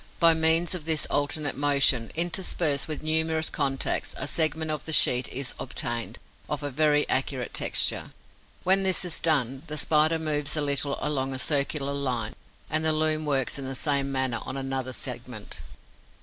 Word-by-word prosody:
By 165 -1 +6
means 160 +2 +2
of 175 -4 -6
this 160 -2 0
alternate 145 0 -1
motion, 140 -4 +2
interspersed 165 -4 +1
with 155 -1 -4
numerous 160 0 +1
contacts, 135 -2 -1
a - - -4
segment 160 0 +2
of 150 -1 -4
the 160 - -2
sheet 125 -4 +4
is 135 0 -4
obtained, 120 -2 -4 0.3
of 150 -1 -3
a 145 - -3
very 150 +1 +2
accurate 130 -2 0
texture. - - 0 0.5
When 190 +2 +4
this 190 -1 +2
is 175 - -1
done, 135 -5 +1
the 150 - -5
Spider 155 +2 +3
moves 155 -1 -2
a - - +2
little 140 -1 +1
along 135 -3 -1
a - - -4
circular 140 +1 +1
line 125 -6 -2 0.3
and 155 0 -1
the 160 0 +3
loom 155 0 0
works 140 -2 0
in 135 - -6
the 135 0 -5
same 140 0 +1
manner 130 -3 -1
on 135 - -5
another 135 -1 -3
segment. 120 -3 -6
145 Hz, 170 wpm, -26 LUFS, 135-155 Hz, 0.5 s, By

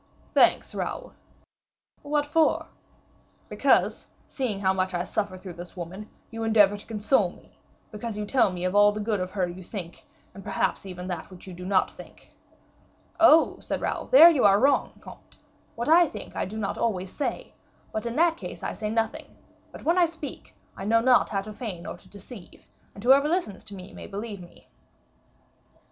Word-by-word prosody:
"Thanks, - - +3
Raoul." - - -5 0.9
"What 290 0 0
for?" 310 +2 +2 0.8
"Because, - - +2 0.2
seeing 240 -8 -3
how 190 -1 +2
much 185 -1 -1
I 175 - -1
suffer 200 -1 -3
through 185 -1 -9
this 175 +2 -10
woman, 185 +5 -7 0.2
you 225 0 -6
endeavor 210 -3 +4
to 205 - -11
console 215 -2 +1
me, - - -19 0.3
because 215 0 -6
you 210 - -3
tell 235 -2 +2
me 180 0 -4
all 205 +2 +5
the 210 - -5
good 210 -1 -1
of 185 0 -3
her 185 -2 -1
you 175 +2 -8
think, 175 -2 -8 0.3
and 195 - -11
perhaps 195 0 -2
even 180 -1 -7
that 175 -3 -5
which 185 -2 -13
you 185 - -9
do 180 +1 -8
not 195 -1 +2
think." - - -15 0.9
"Oh," 325 -1 +6
said - - -4
Raoul, - - -3
"there 345 -9 +9
you 290 -6 +1
are 200 0 +6
wrong, 280 +4 +2
comte; - - -14 0.4
what 235 +1 -4
I 335 +2 +6
think - - -9
I - - -1
do 215 +4 -7
not 205 -3 -3
always 190 -5 -2
say, 290 - -4 0.4
but 220 +2 -3
in 235 - -4
that 330 +1 +3
case - - -8
I - - -3
say 215 -1 -4
nothing; 225 0 -3 0.3
but - - -11
when 340 +3 +3
I 345 - +5
speak, 320 -3 -9 0.2
I - - -7
know 230 +3 +3
not 250 +1 +4
how 195 -2 -2
to 215 +1 -9
feign 205 -7 -6
or - - -6
to - - -21
deceive; 200 -1 -13 0.3
and 200 - -10
whoever 275 +4 +5
listens 330 - -2
to 205 -2 -10
me 185 0 -11
may - - -9
believe 205 0 -6
me." 175 - -16
210 Hz, 190 wpm, -26 LUFS, 190-250 Hz, 0.9 s, there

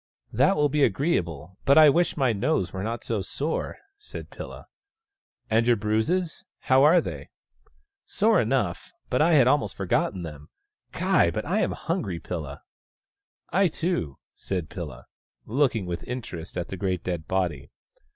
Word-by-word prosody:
" - - -34
That 195 - +5
will 150 0 +3
be 145 0 +1
agreeable, 95 - -1
but 140 - +5
I 155 -1 +9
wish 170 +4 +2
my 130 -5 +2
nose 95 -3 0
were 95 - -4
not 115 +3 -3
so 110 -4 -1
sore," 145 - -3 0.2
said 425 - -9
Pilla. - - -9 0.4
" 400 -1 -56
And 115 +2 +3
your 120 - +5
bruises— 110 - -1 0.2
how 130 +1 +4
are 160 +4 +7
they? - - -7 0.3
" - - -37
" 400 -1 -67
Sore 220 +1 +4
enough 110 -7 -1
— - - -43
but 125 - +2
I 165 +2 +4
had 140 -5 +6
almost 130 - +2
forgotten 90 - 0
them. 75 -2 -9 0.4
Ky, - - +3
but - - -3
I - - 0
am - - +1
hungry, 90 -3 -3
Pilla! 75 -6 -6 0.3
" - - -70
" - - -80
I, 195 +1 +4
too," 160 - -2 0.2
said 90 -5 -4
Pilla, 75 -9 -7 0.4
looking 120 -4 +1
with 85 -1 -4
interest 90 -10 -6
at 90 - -3
the 95 - -5
great 90 -2 -2
dead 85 -3 -3
body. 85 -8 -1
110 Hz, 180 wpm, -26 LUFS, 90-150 Hz, 0.4 s, I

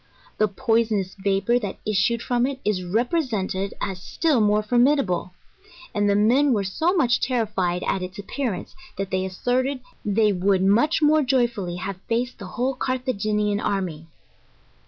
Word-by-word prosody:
The 215 - +4
poisonous 220 -3 0
vapour 200 +4 +1
that 205 -5 -5
issued 215 +3 +1
from 245 0 +1
it 270 -1 -5
is 200 -3 0
represented 210 - -1
as 185 -2 -4
still 295 - +1
more 210 0 +3
formidable; 240 -7 +2 0.6
and 205 -1 +1
the 200 - +3
men 250 +7 +4
were 205 -3 +1
so 320 - 0
much 245 -8 +2
terrified 210 -8 0
at 190 - -1
its 185 +1 -6
appearance, 210 +1 -4 0.2
that 195 0 -4
they 185 0 0
asserted, 255 +8 -1 0.2
they 210 +1 +2
would 190 +1 +2
much 240 - +3
more 305 +1 +5
joyfully 240 -9 0
have 185 +1 -5
faced 240 +2 -1
the 200 - -7
whole 255 +2 +1
Carthaginian 215 -6 -1
army. 180 -7 -2
215 Hz, 150 wpm, -23 LUFS, 195-250 Hz, 0.6 s, more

